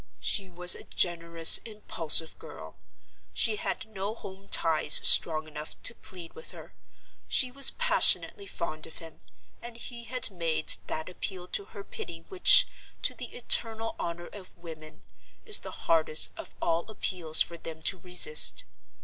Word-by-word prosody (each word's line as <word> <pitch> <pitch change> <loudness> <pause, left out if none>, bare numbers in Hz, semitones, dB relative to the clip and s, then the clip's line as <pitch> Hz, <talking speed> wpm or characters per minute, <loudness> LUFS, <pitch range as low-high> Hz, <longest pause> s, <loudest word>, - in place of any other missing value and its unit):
She 195 -2 -3
was 180 0 +2
a - - -7
generous, 170 -2 +2
impulsive 165 -7 0
girl; - - -14 0.6
she 220 -2 -1
had - - -6
no 210 0 -8
home 195 -2 -14
ties 155 -2 +2
strong 155 -1 +5
enough 150 0 -11
to - - +3
plead 180 -7 -12
with 480 - -10
her; - - -11 0.5
she 255 -1 0
was 275 +1 +10
passionately 475 -4 0
fond 155 - -7
of 160 - -10
him—and 160 - -16
he 235 0 -11
had 250 -1 -2
made 165 -3 -3
that 155 - -7
appeal 185 0 -7
to 200 - -3
her 200 - -13
pity 165 -3 -10
which, - - +4 0.4
to - - -3
the - - -11
eternal 225 0 0
honor 170 0 -7
of 195 -3 -14
women, 160 -2 -14 0.4
is 425 -2 +3
the - - -11 0.2
hardest 160 -2 +1
of - - -13
all 170 +4 -4
appeals 170 -7 0
for 170 - -11
them 160 -1 -11
to 190 - -1
resist. 180 -3 +3
175 Hz, 150 wpm, -26 LUFS, 160-220 Hz, 0.6 s, was